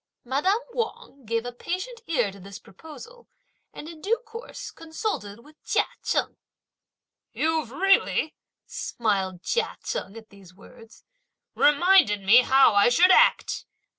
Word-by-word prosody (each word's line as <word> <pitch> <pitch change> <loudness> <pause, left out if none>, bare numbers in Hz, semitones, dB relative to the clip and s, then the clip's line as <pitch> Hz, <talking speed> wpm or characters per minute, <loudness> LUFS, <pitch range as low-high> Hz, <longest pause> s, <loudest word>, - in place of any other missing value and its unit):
Madame 290 - +1 0.2
Wang 445 - -5
gave 230 +1 -2
a 245 - -5
patient 370 - -6
ear 245 -11 0
to 200 - -14
this 195 +1 -10
proposal, 320 - -14 0.4
and, 300 - -10
in 325 -2 -11
due 440 +6 0
course, 460 +2 -9
consulted 320 - -6
with 305 +1 -21
Chia - - +1 0.2
Cheng. - - -1 1.0
"You've 315 -5 -1
really," 370 - +1 0.3
smiled 190 -5 -3
Chia 475 - -2
Cheng 200 +4 -5
at 220 -1 -14
these 190 -3 -17
words, 225 +3 -17 0.5
"reminded 295 - +4
me 220 +6 +7
how 265 0 +4
I 205 +3 +5
should 355 +9 +5
act! - - +3
275 Hz, 135 wpm, -25 LUFS, -, 1.0 s, me